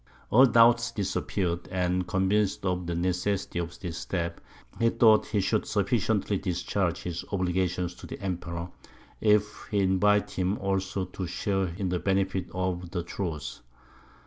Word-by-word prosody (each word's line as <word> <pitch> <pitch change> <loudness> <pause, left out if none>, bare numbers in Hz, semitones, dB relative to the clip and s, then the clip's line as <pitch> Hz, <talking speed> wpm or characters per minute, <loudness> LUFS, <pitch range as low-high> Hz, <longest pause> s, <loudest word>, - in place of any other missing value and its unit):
All 130 +4 +8
doubts 115 0 +5
disappeared; 90 -3 -2
and, 90 0 0
convinced 95 +2 +1
of 90 -1 -1
the 85 - -2
necessity 90 +1 -1
of 85 0 -5
this 85 -3 -4
step, 85 -2 -3 0.4
he 115 - +4
thought 110 -2 +5
he 105 - 0
should 105 +3 0
sufficiently 105 -2 +1
discharge 90 -1 -1
his 85 -1 -4
obligations 90 -2 0
to - - -10
the - - -7
Emperor, 90 -2 -4 0.5
if 105 -1 +2
he 105 -3 +1
invited 100 +2 +3
him 95 +2 0
also 95 -1 -1
to 90 0 -5
share 95 +2 -1
in 95 -3 -1
the 90 0 0
benefit 95 -1 0
of 90 -1 -2
the 85 -1 -3
truce. 85 -6 -5
95 Hz, 145 wpm, -28 LUFS, 90-100 Hz, 0.5 s, All